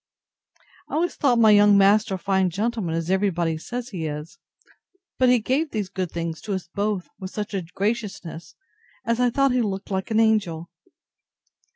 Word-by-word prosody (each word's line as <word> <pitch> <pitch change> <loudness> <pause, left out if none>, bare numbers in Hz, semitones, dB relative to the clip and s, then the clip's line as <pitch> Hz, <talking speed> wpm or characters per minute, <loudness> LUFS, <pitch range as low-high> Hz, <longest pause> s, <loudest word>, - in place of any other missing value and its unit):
I - - -4
always 340 +2 0
thought 255 -5 +2
my 220 -2 +6
young 205 -1 +6
master 200 +1 +4
a - - -4
fine 190 0 +1
gentleman, 205 -2 -2
as 165 +2 -2
every 195 +1 +2
body 165 -3 -1
says 245 +7 -6
he 170 -8 -4
is: 150 +2 -7 0.8
but 255 -1 +5
he 250 - +6
gave 265 +8 0
these 210 -6 -3
good 185 -2 -3
things 165 -1 -4
to 205 -2 -3
us 185 -2 -6
both 205 -2 -1
with 190 -2 -6
such 210 +1 -5
a 195 - -1
graciousness, 195 -2 -4 0.5
as 230 +1 0
I 250 0 +3
thought 275 +2 +2
he 250 0 +2
looked 200 -2 -3
like 190 +2 -2
an 220 -1 +2
angel. 195 -7 +1
200 Hz, 185 wpm, -24 LUFS, 180-230 Hz, 0.8 s, my